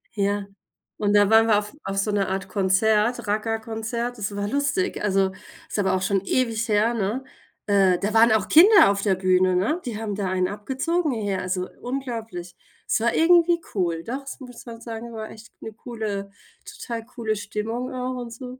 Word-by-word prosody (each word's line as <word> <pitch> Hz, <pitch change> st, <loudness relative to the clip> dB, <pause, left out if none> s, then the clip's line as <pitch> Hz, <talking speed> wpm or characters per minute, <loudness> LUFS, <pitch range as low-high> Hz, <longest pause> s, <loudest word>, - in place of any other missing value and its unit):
Ja. 200 Hz, 0 st, 0 dB, 0.5 s
Und 205 Hz, -1 st, +1 dB
da 205 Hz, 0 st, +5 dB
waren 225 Hz, +1 st, +6 dB
wir 215 Hz, -, +5 dB
auf 210 Hz, +6 st, -4 dB
auf 195 Hz, 0 st, -4 dB
so 205 Hz, +2 st, +1 dB
'ner 200 Hz, -2 st, 0 dB
Art 190 Hz, +1 st, -3 dB
Konzert, 210 Hz, +4 st, +1 dB
Raggae-Konzert, 225 Hz, +3 st, -2 dB
das 205 Hz, 0 st, -3 dB
war 200 Hz, 0 st, -2 dB
lustig. 285 Hz, -, -1 dB
Also, 195 Hz, -1 st, +2 dB, 0.4 s
ist -, -, -4 dB
aber 195 Hz, -, +2 dB
auch 185 Hz, 0 st, 0 dB
schon 195 Hz, 0 st, +1 dB
ewig 230 Hz, +2 st, 0 dB
her, 215 Hz, +3 st, +3 dB
ne? 225 Hz, +4 st, -2 dB, 0.4 s
Äh, 195 Hz, -3 st, +4 dB
da 205 Hz, +2 st, -2 dB
waren 225 Hz, +1 st, +6 dB
auch 220 Hz, -3 st, +2 dB
Kinder 380 Hz, -, +7 dB
auf 200 Hz, 0 st, -2 dB
der 200 Hz, -2 st, +2 dB
Bühne, 185 Hz, 0 st, +2 dB
ne? 235 Hz, -, 0 dB
Die 230 Hz, -4 st, -4 dB
haben 220 Hz, -2 st, -3 dB
da 195 Hz, -2 st, -2 dB
einen 185 Hz, 0 st, +1 dB
abgezogen 270 Hz, -, -1 dB
hier, 200 Hz, -3 st, -1 dB
also 185 Hz, 0 st, -2 dB
unglaublich. 230 Hz, -9 st, -5 dB, 0.3 s
Es -, -, +1 dB
war 235 Hz, +1 st, +1 dB
irgendwie 340 Hz, +1 st, +5 dB
cool. 170 Hz, -4 st, -1 dB
Doch, 260 Hz, +8 st, -4 dB
das 275 Hz, 0 st, -9 dB
muss 245 Hz, -3 st, -11 dB
man 230 Hz, -1 st, -9 dB
sagen, 230 Hz, 0 st, -7 dB
war 220 Hz, -1 st, -6 dB
echt 225 Hz, +1 st, -13 dB
'ne 220 Hz, -, -7 dB
coole 215 Hz, -4 st, -5 dB, 0.4 s
total 230 Hz, -2 st, -6 dB
coole 230 Hz, -3 st, -3 dB
Stimmung 215 Hz, +4 st, -4 dB
auch 255 Hz, 0 st, -3 dB
und 235 Hz, -1 st, -7 dB
so., 250 Hz, +2 st, -9 dB
220 Hz, 190 wpm, -24 LUFS, 200-240 Hz, 0.5 s, Kinder